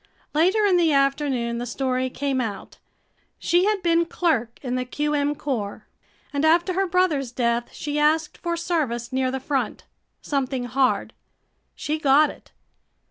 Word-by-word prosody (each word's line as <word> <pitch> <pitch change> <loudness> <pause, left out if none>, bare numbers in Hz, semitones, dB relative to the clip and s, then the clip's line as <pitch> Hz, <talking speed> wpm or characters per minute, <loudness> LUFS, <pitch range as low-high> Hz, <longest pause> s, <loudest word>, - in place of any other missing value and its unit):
Later 370 +8 +3
in 380 -3 +4
the 335 -2 +3
afternoon 275 -4 +1
the 245 - -4
story 255 +1 -1
came 270 0 -1
out. 210 -5 -6 0.6
She 350 +2 +2
had 415 -2 0
been 335 -1 +3
clerk 260 -11 0
in 250 -2 -3
the 255 0 0
Q. 295 +4 -2
M. 290 0 +1
corps 230 -9 -4 0.5
and 285 +1 -1
after 345 +4 +3
her 385 +1 +1
brother's 335 -8 +1
death 235 -1 -1
she 295 0 -3
asked 305 +1 +1
for 340 -1 -2
service 275 -9 -2
near 260 0 +1
the 265 +1 -3
front, 270 0 -2 0.4
something 265 -3 -2
hard. 255 +2 0 0.6
She 305 +1 -3
got 295 +1 +4
it. - - -18
285 Hz, 155 wpm, -24 LUFS, 255-330 Hz, 0.6 s, in